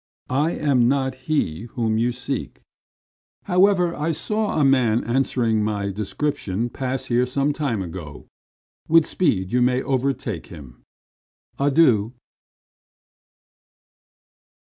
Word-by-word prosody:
I 150 +6 +1
am 135 -5 +2
not 130 0 +1 0.2
he 115 - 0
whom 110 -2 +1
you 120 +2 +1
seek. 125 +2 -5 0.8
However, 180 -1 +3
I 160 +2 -1
saw 210 +1 -1
a 145 - +4
man 125 -4 +3
answering 115 -3 +1
my 100 -2 -2
description 110 +1 -2
pass 130 -1 -3
here 125 0 +1
some 140 +3 0
time 130 -10 -2
ago. 80 -5 -8 0.6
With 165 -1 +5
speed 95 - 0
you 125 - +3
may 125 +1 +2
overtake 130 - -2
him. 70 -7 -12 0.8
Adieu." 135 -6 +3
125 Hz, 110 wpm, -22 LUFS, 110-145 Hz, 0.8 s, With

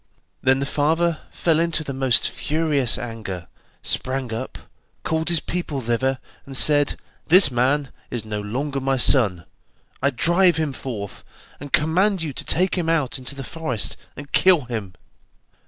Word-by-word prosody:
Then 130 0 +3
the 140 - -2
father 160 +3 0
fell 165 -2 0
into 165 -1 0
the 140 - -5
most 130 -3 +3
furious 150 -5 +1
anger, 105 -7 -6 0.4
sprang 130 -2 -2
up, 130 +4 -5 0.5
called 160 +1 -1
his 170 -2 +2
people 170 -5 -4
thither, 130 +2 -1 0.3
and 135 -1 -2
said: 145 -1 +5 0.3
'This 175 -3 +7
man 135 +3 +1 0.2
is 120 -3 -5
no 105 -1 -4
longer 135 +7 -3
my 135 0 0
son, 105 - +3 0.6
I 140 - +3
drive 170 +7 +3
him 155 -3 -1
forth, 105 -7 -7 0.4
and 145 0 -9
command 180 +4 +2
you 150 -4 -4
to - - -5
take 185 +2 +1
him 165 -2 -1
out 150 -6 0
into 130 +2 -4
the 135 - -6
forest, 130 -6 -2 0.2
and 145 0 -10
kill 185 -4 +4
him. 110 -7 -6
140 Hz, 155 wpm, -22 LUFS, 125-160 Hz, 0.6 s, This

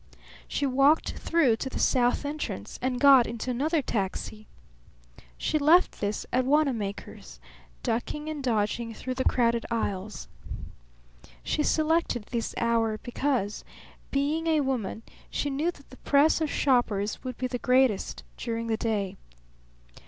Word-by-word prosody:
She 285 - -1
walked 275 +4 +3
through 290 -9 +2
to 265 - -4
the - - -6
south 250 +2 +2
entrance 300 +1 -5
and 250 -1 -1
got 270 -2 +7
into 235 +2 -4
another 295 +5 0
taxi. 215 0 -3 0.9
She 305 - 0
left 325 +5 +4
this 205 0 -2
at 255 - +3
Wanamaker's, 255 -8 -1 0.4
ducking 245 +6 -2
and 310 -2 -4
dodging 225 -1 -1
through 255 +3 -4
the 260 0 -1
crowded 235 -2 +2
aisles. 210 -3 -3 1.2
She - - 0
selected 310 -6 +1
this 235 -2 -2
hour 230 -2 +1
because, 245 -5 -1 0.5
being 300 +4 0
a 315 -2 +3
woman, 245 -5 -2 0.3
she 290 - -2
knew 295 +5 0
that 285 -7 -10
the 260 - -12
press 295 +3 +3
of 315 - 0
shoppers 225 -8 +1
would 255 -2 -5
be 255 - -2
the 250 -1 -3
greatest 250 -5 +2
during 230 -1 -3
the 225 -1 0
day. 210 -5 -2
255 Hz, 135 wpm, -27 LUFS, 225-285 Hz, 1.2 s, got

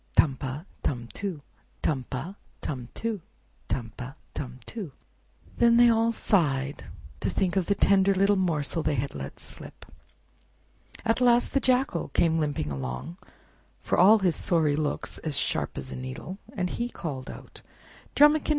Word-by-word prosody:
Tum 140 -4 +5
pa, 135 +3 -5 0.2
tum 120 -4 -2
too; 185 -8 -4 0.4
Tum 135 -5 0
pa, 155 +8 -4 0.3
tum 125 -4 -4
too; 225 -4 -2 0.5
Tum 115 -4 -2
pa, 130 +3 -7 0.2
tum 130 -2 -5
too!" 200 - -6 0.7
Then 235 0 +6
they 240 0 +8
all 230 0 +3
sighed 145 -11 +1 0.3
to - - -1
think 185 -1 0
of 190 -3 +1
the 200 - +3
tender 195 0 +4
little 195 +2 +4
morsel 165 -4 0
they 155 -1 +1
had 140 +2 -2
let 70 -1 -7
slip. - - -10 1.2
At 225 +3 +2
last 245 -1 +4
the 275 - +4
Jackal 255 -8 +1
came 165 -1 +3
limping 145 - -1
along, 65 - -5 0.7
for - - +1
all 205 +5 +8
his 185 -5 +2
sorry 155 -4 +2
looks 150 -1 -2
as 155 -4 -3
sharp - - -1
as 65 - -6
a - - -5
needle, 130 +9 -6
and 180 -2 -2
he 235 - -1
too - - -14
called 135 -5 -5
out— - - -10 0.5
"Drumikin! 295 +2 +5
165 Hz, 160 wpm, -27 LUFS, 135-205 Hz, 1.2 s, they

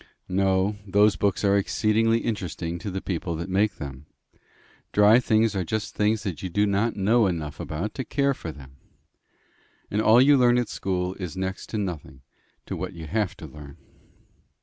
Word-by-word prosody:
"No. 95 +2 +1
Those 105 +1 +4
books 100 +1 0
are 100 -1 +4
exceedingly 110 +3 +2
interesting 85 -5 -3
to 100 - -5
the 95 0 -5
people 85 -2 -3
that 85 +4 -5
make 100 +3 +2
them. 70 -1 -8 0.9
Dry 105 +3 +6
things 110 -3 +2
are 95 - 0
just 110 +4 -3
things 105 0 +1
that 90 -8 -4
you 95 - -4
do 105 +4 +2
not 105 +3 0
know 110 +3 +3
enough 80 -5 -4
about 85 +8 -4
to 130 - -4
care 140 +1 +1
for 85 -10 -7
them. 65 -3 -14 1.1
And 105 - +1
all 110 +2 +6
you 140 +2 +6
learn 120 -1 +5
at 120 -3 0
school 90 -1 -2
is 90 -1 -5
next 95 0 -4
to 110 - -3
nothing 85 -9 -5 0.4
to - - -4
what - - -5
you 80 -1 -8
have 105 +3 -1
to 80 - -9
learn." 70 -1 -11
100 Hz, 180 wpm, -25 LUFS, 85-110 Hz, 1.1 s, Dry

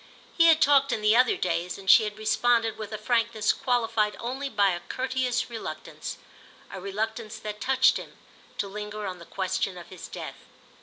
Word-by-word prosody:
He 335 -1 +6
had 320 -1 +6
talked 275 -1 +4
in 215 - -2
the 210 +1 +5
other 250 +1 +4
days, 180 0 -2
and 195 -1 -12
she 215 - +7
had 210 0 -5
responded 225 +1 +2
with 215 -1 -7
a 215 - -3
frankness 225 -1 +1
qualified 225 -4 0
only 265 +4 -4
by 205 -5 +3
a 175 - -3
courteous 255 +2 -2
reluctance, 235 -2 -7 0.5
a 190 - -7
reluctance 215 +2 -4
that 210 0 -7
touched 265 0 +4
him, - - -10 0.4
to 200 - -2
linger 210 +1 -6
on 185 -2 -5
the 170 - -13
question 190 0 -2
of 175 - -11
his 185 -2 -9
death. - - -9
215 Hz, 185 wpm, -27 LUFS, 200-245 Hz, 0.5 s, she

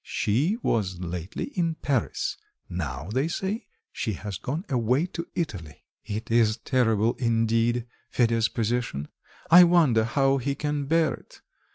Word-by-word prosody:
"She 145 - 0
was 95 -6 0
lately 90 - -5
in 165 -3 0
Paris; 135 -7 -1 0.3
now, 75 -3 -4
they 135 +5 +1
say, 190 +6 -3 0.2
she 110 - -2
has 100 0 -6
gone 155 +9 -4
away 125 +4 +1
to 170 -1 -6
Italy." 95 - -4 0.2
"It 110 +2 -5
is 115 -1 +3
terrible, 115 -2 +2
indeed 115 0 +1 0.2
Fedya's 115 -2 +2
position; 115 - -2 0.4
I 180 +2 +10
wonder 160 -10 +4
how 135 +3 +2
he 140 +2 -2
can 145 0 -2
bear 160 +1 +2
it. - - -14
120 Hz, 140 wpm, -26 LUFS, 110-145 Hz, 0.4 s, I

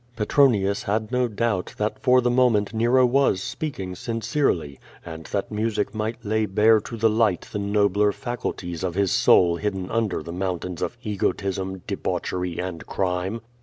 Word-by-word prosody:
Petronius 105 -4 +2
had 110 +2 -2
no 125 -1 +2
doubt 110 -3 -2
that 105 0 -2
for 125 0 +5
the 120 0 +1
moment 120 -5 +3
Xero 120 +3 +4
was 135 -6 +2
speaking 125 -8 -4
sincerely, 115 - -1 0.3
and 80 -1 -8
that 100 +1 -3
music 110 -1 -1
might 110 +2 -4
lay 110 +1 +1
bare 110 +3 +4
to 115 - -7
the 115 +1 +3
light 110 -4 +2
the 105 - -3
nobler 100 0 +2
faculties 95 -8 -5
of 90 -2 -2
his 100 -2 +1
soul 85 -2 +4
hidden 95 -2 -3
under 115 -4 -1
the 85 - -7
foun 90 0 -1
tains 90 0 -7
of 120 - -3
ejrotism, 95 -2 -2
debauchery, 90 -2 -3
and 90 -3 -5
crime. 95 +4 -2
105 Hz, 165 wpm, -24 LUFS, 95-115 Hz, 0.3 s, for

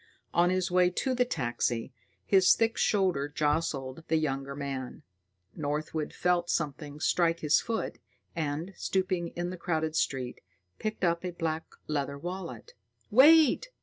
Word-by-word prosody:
On 175 +1 +4
his 185 0 0
way 180 0 +4
to 255 +8 -1
the 250 0 +2
taxi, 120 - -2 0.3
his 190 -2 +5
thick 225 0 +1
shoulder 185 -9 +1
jostled 145 -2 -1
the 160 - +2
younger 140 -2 -2
man. 135 -3 -5 0.5
Northwood 150 +1 -3
felt 175 -1 +1
something 150 -1 -2
strike 170 +1 +2
his 150 -1 +4
foot, 225 -1 -3 0.4
and, 160 +3 -3
stooping 185 -2 -1
in 175 +1 -2
the 185 - -6
crowded 160 -2 -1
street, 130 -5 -1 0.4
picked 215 -2 -4
up 170 0 +1
a 180 -1 -4
black 160 -1 -3 0.2
leather 140 -2 -2
wallet. 180 - -7 0.4
"Wait!" 310 - +6
165 Hz, 140 wpm, -29 LUFS, 145-185 Hz, 0.5 s, Wait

